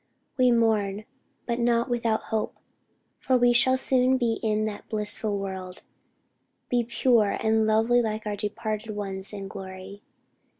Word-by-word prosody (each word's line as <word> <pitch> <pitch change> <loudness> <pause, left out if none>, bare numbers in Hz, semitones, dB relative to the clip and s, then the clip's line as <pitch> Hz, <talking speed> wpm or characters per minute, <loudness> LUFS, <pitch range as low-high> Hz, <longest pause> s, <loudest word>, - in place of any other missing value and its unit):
We 255 -1 +4
mourn, 215 -3 +1 0.4
but 235 0 -2
not 235 +1 +2
without 230 -3 -1
hope; 220 - -1 0.6
for 260 - +2
we 245 0 +4
shall 260 +2 +4
soon 260 0 +2
be 235 -3 0
in 215 -1 0
that 210 -1 -6
blissful 210 -1 +1
world 190 -2 -6 0.9
be 245 -1 +2
pure 235 -2 +2
and 220 0 +2
lovely 225 +3 +3
like 220 -1 -3
our 210 -1 -2
departed 215 +1 -4
ones 195 -1 -3
in 200 -2 -6
glory." 190 +1 -9
220 Hz, 140 wpm, -26 LUFS, 205-235 Hz, 0.9 s, We